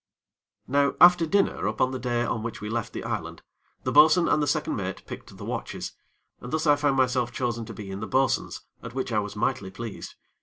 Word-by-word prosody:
Now 140 +1 +2
after 175 -2 +7
dinner 195 - +1
upon 110 +5 +1
the 130 - -4
day 120 -1 0
on 115 - -2
which 115 0 -5
we 105 +1 -5
left 115 -2 -2
the - - -6
island, - - -4 0.4
the - - -1
bo'sun 160 +3 +6
and 150 - +3
the 145 - 0
second - - 0
mate - - -5
picked - - -10
the - - -8
watches, - - -4 0.5
and 125 - -8
thus 155 +1 0
I 145 -1 +6
found 145 -2 +1
myself 125 -2 +2
chosen 120 -2 -2
to 115 - -8
be 100 -1 -7
in 95 - -5
the 110 - -5
bo'sun's, 135 0 0 0.2
at 115 +1 -9
which 130 -1 -2
I 110 - +2
was 105 0 -5
mightly 100 -2 -1
pleased. 110 +2 -8
125 Hz, 220 wpm, -26 LUFS, 110-145 Hz, 0.5 s, after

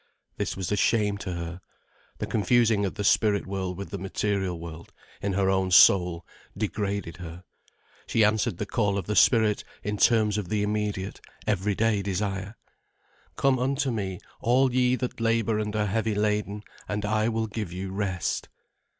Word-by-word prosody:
This - - -2
was 95 0 -3
a - - +3
shame 105 -1 +2
to 95 -4 -4
her. 85 +1 -6 0.6
The - - -3
confusing 110 -1 +2
of - - -6
the 105 - -3
spirit 100 0 +3
world 95 -2 -3
with 100 - -7
the 100 - -4
material 95 -2 -1
world, 85 0 -9 0.3
in 100 -1 -1
her 95 0 +1
own 95 -1 +2
soul, 90 -2 +5 0.3
degraded 100 -3 -2
her. 90 0 -9 0.6
She 115 - +3
answered 105 -4 +2
the 105 - -3
call 100 -1 0
of 95 - -3
the 105 - -2
spirit 110 -3 +4 0.2
in 105 0 -2
terms 105 -2 +3
of 95 -4 -6
immediate, 105 -2 -2 0.2
everyday 105 +1 +1
desire. 100 +1 -3 0.8
"Come 135 -2 +2
unto 135 +1 0
me, 95 -5 -3 0.2
all 130 +2 +3
ye 125 0 +3
that 125 -2 -4
labour 115 -1 +1
and 105 0 -3
are 105 -1 +1
heavy 110 +1 0
laden, 105 0 -1 0.2
and 105 0 -2
I 110 +1 +1
will 115 -1 -1
give 105 -4 -5
you 95 +2 -5
rest." 95 -3 -2
105 Hz, 165 wpm, -26 LUFS, 95-110 Hz, 0.8 s, soul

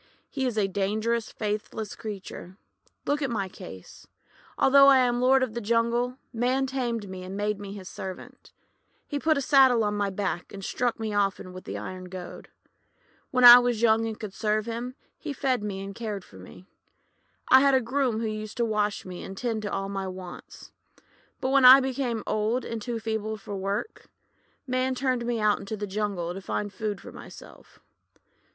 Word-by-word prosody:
;<He 265 -2 -1
is 235 -3 -3
a 205 -2 +2
dangerous, 215 +4 -1
faithless 210 0 -4
creature. 195 -4 -8 0.5
Look 290 +1 0
at 275 - 0
my 205 -5 -2
case. 95 - -12 0.5
Although 275 +1 +6
I 275 -1 +8
am 245 -1 +2
lord 260 +1 +4
of 245 -4 -3
the 235 - -4
jungle, 235 +3 +1 0.2
Man 250 +3 +1
tamed 240 -5 -2
me, 185 -1 -7
and 190 +2 -6
made 205 0 -1
me 200 -1 -7
his 195 -3 -9
servant. 190 -1 -9 0.5
He 290 - -3
put 315 +1 +2
a - - 0
saddle 260 -4 +5
on 210 0 0
my 205 -1 0
back, 190 -3 -3
and 195 -1 -8
struck 245 -2 -1
me 220 -1 -3
often 195 -2 -1
with 185 - -11
an - - -4
iron 185 0 -7
goad. 180 -1 -9 0.8
When 250 -1 +1
I 245 0 +12
was 245 -2 0
young 225 0 +4
and 220 -1 -6
could 215 -4 -6
serve 215 0 0
him, 235 +2 -5 0.2
he 305 -3 -5
fed 260 -4 0
me 195 -2 -4
and 200 0 -7
cared 210 -3 -5
for 95 - -16
me. 95 - -13 0.8
I 260 - +9
had 275 0 +4
a - - +5
groom 250 -2 0
who - - -1
used 215 +1 -5
to 235 - +2
wash 210 -2 -1
me 180 -1 -7
and 195 0 -8
tend 230 -2 -2
to 205 - -4
all 195 - -2
my 195 -1 -4
wants. 185 -1 -10 0.7
But 260 - -1
when 275 -1 +4
I 255 +2 +11
became 260 -4 -2
old 215 +4 0
and 230 -1 -5
too 235 +1 -3
feeble 220 -1 -3
to 205 0 -7
work, 195 - -4 0.6
Man 255 0 0
turned 255 -2 -1
me 240 -1 -1
out 210 -1 +2
into 200 +2 -6
the 205 - -3
jungle 195 -4 -2
to 195 - -7
find 205 +1 -3
food 210 -3 -3
for - - -11
myself. - - -13
220 Hz, 195 wpm, -27 LUFS, 200-250 Hz, 0.8 s, I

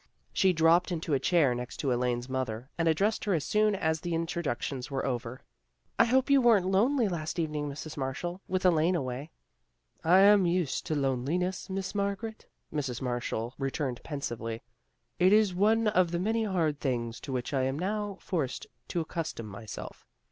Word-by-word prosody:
She 190 - +4
dropped 170 +2 +4
into 160 -3 -2
a 135 - +3
chair 145 -3 +3
next 125 0 -6
to 135 - -1
Elaine's 120 0 -1
mother, 130 -1 -3
and 165 -1 0
addressed 195 +7 +2
her 200 -3 +2
as 155 - -1
soon 215 -1 +2
as 160 -4 0
the 175 -1 -2
in 165 +1 0
troductions 145 -6 -3
were 135 -2 -2
over. 125 -1 -3 0.3
" - - -43
I - - +7
hope 260 +2 +3
you 275 -1 +6
weren't 225 -6 +5
lonely 225 +6 +3
last 165 -4 -3
evening, 150 -3 -1
Mrs. 150 +2 -7
Marshall, 160 +7 -3
with 185 0 -1
Elaine 170 0 +4
away." 135 0 -3 0.4
" - - -50
I 180 +4 +6
am 200 -2 +6
used 170 -5 0
to 155 - 0
loneliness, 145 +9 -1
Miss 190 -1 -3
Margaret," 205 +2 -3 0.3
Mrs. 135 -6 -2
Marshall 120 -2 -3
returned 135 -2 -2
pensively. 115 -6 -5 0.6
"It 185 +1 +5
is 210 -3 +4
one 215 +4 +3
of 185 -5 +3
the 170 - -1
many 220 +4 0
hard 165 -7 0
things 120 -4 -2
to - - -7
which 125 +1 -3
I 135 - +2
am 135 +1 -1
now 205 +3 -2
forced 150 -9 -2 0.2
to 170 - -1
accustom 160 -7 -4
myself. 105 +1 -9
160 Hz, 185 wpm, -29 LUFS, 130-190 Hz, 0.6 s, I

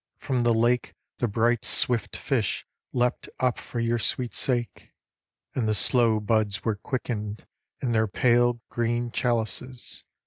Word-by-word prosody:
From 130 -2 -1
the 120 0 +3
lake 120 +2 +1 0.2
The 120 - +1
bright 115 +2 +1
swift 120 -2 +1
fish 115 -8 -1 0.3
leapt 125 0 0
up 125 -2 +1
for 120 - -5
your 115 0 +1
sweet 115 +2 0
sake, 120 -5 -1 0.6
And 120 -4 0
the 110 - +2
slow 115 -1 +4
buds 105 -1 0
were 110 - +2
quickened 105 -2 -4 0.4
in 125 - +1
their 110 -1 +2
pale 120 +2 +3
Green 120 0 -1
chalices. 120 +1 -2
120 Hz, 140 wpm, -26 LUFS, 110-120 Hz, 0.6 s, slow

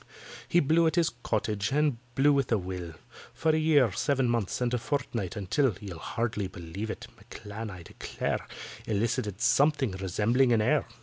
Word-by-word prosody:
He 175 - +4
blew 165 +2 +4
at 160 - 0
his 170 -3 +3
"Cottage," 105 -2 -1
and 145 -4 +2 0.2
blew 145 +2 +5
with 140 -3 +1
a 115 - +4
will, 90 -3 -5 0.4
For 160 - +2
a - - +2
year, 145 -7 +4
seven 135 +5 +1
months, 115 -5 0
and 125 -1 0
a 125 - +1
fortnight, 115 - -2
until 105 +4 +1
(You'll 95 -5 -7
hardly 110 -2 -2
believe 95 +4 -6
it) - - -5
M'CLAN, 105 +1 -8
I 90 -3 -9
declare, - - -4 0.4
Elicited 105 -1 -1
something 135 0 +3
resembling 105 +7 +2
an 110 - +3
air. - - +2
115 Hz, 170 wpm, -29 LUFS, 100-135 Hz, 0.4 s, blew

